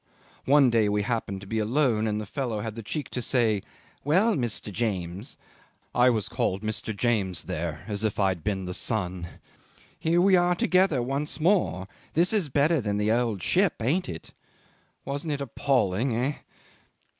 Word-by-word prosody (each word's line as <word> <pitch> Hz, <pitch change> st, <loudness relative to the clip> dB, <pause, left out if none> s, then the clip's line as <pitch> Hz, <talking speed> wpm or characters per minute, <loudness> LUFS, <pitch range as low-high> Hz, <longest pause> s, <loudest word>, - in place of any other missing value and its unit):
"One 140 Hz, -2 st, +5 dB
day 110 Hz, -3 st, +3 dB
we 105 Hz, 0 st, +1 dB
happened 105 Hz, -4 st, -2 dB
to -, -, -10 dB
be 110 Hz, +2 st, -1 dB
alone 115 Hz, -1 st, +1 dB
and 105 Hz, 0 st, -1 dB
the 110 Hz, -, -4 dB
fellow 115 Hz, -1 st, -3 dB
had 110 Hz, 0 st, -4 dB
the 115 Hz, -, -7 dB
cheek 145 Hz, +7 st, -4 dB
to 125 Hz, -, -3 dB
say, 115 Hz, -5 st, +1 dB, 0.4 s
'Well, 190 Hz, -, +3 dB
Mr. 115 Hz, -, -3 dB
James' 100 Hz, -, -3 dB, 0.6 s
I 125 Hz, +1 st, +5 dB
was 110 Hz, -5 st, 0 dB
called 95 Hz, +3 st, -1 dB
Mr. 110 Hz, 0 st, -3 dB
James 100 Hz, -9 st, +1 dB
there 85 Hz, -1 st, -4 dB
as 105 Hz, -1 st, -3 dB
if 110 Hz, -2 st, -1 dB
I 100 Hz, -1 st, +4 dB
had 90 Hz, -4 st, -4 dB
been 95 Hz, -1 st, -2 dB
the 90 Hz, -, -4 dB
son 90 Hz, -5 st, -2 dB, 0.7 s
'here 165 Hz, +2 st, +2 dB
we 190 Hz, +1 st, +5 dB
are 175 Hz, 0 st, +3 dB
together 180 Hz, -7 st, +2 dB
once 140 Hz, +5 st, -3 dB
more. 160 Hz, -, +1 dB, 0.3 s
This 175 Hz, +6 st, +3 dB
is 195 Hz, -9 st, +1 dB
better 145 Hz, +3 st, +2 dB
than 105 Hz, -2 st, -1 dB
the 105 Hz, +1 st, +1 dB
old 115 Hz, -5 st, 0 dB
ship 185 Hz, -, +2 dB
ain't 145 Hz, +11 st, 0 dB
it?'... 80 Hz, -2 st, -8 dB, 0.7 s
Wasn't 145 Hz, +3 st, -3 dB
it 145 Hz, -, -3 dB
appalling, 125 Hz, -4 st, 0 dB
eh? 130 Hz, +5 st, 0 dB
115 Hz, 175 wpm, -26 LUFS, 100-145 Hz, 0.7 s, One